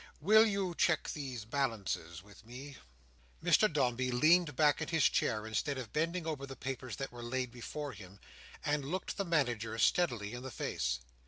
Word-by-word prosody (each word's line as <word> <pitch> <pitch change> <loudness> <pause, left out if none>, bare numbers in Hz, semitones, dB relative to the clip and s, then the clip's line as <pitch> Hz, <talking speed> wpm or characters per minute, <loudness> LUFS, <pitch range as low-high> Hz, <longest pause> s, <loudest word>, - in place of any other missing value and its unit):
Will 215 +7 +6
you 195 -4 -1
check 165 -1 +2
these 130 -7 -5
balances 105 - -2
with 100 +1 -16
me?" 130 +4 -10 0.7
Mr 215 - +5
Dombey 130 -4 +1
leaned 155 +4 +4
back 150 +2 +3
in 160 - -2
his 160 -4 +1
chair, 110 0 0
instead 130 +6 -1
of 125 -4 -7
bending 165 +3 0
over 145 -4 -3
the 135 - -8
papers 130 -2 -5
that 135 - -5
were 120 0 -9
laid 125 +1 -2
before 140 +4 -5
him, 100 -3 -12 0.5
and 145 -1 +1
looked 180 +7 -3
the 200 - 0
Manager 120 - 0
steadily 120 -8 +2
in 125 - -6
the 130 - -6
face. 60 - -2
130 Hz, 175 wpm, -33 LUFS, 115-155 Hz, 0.7 s, Will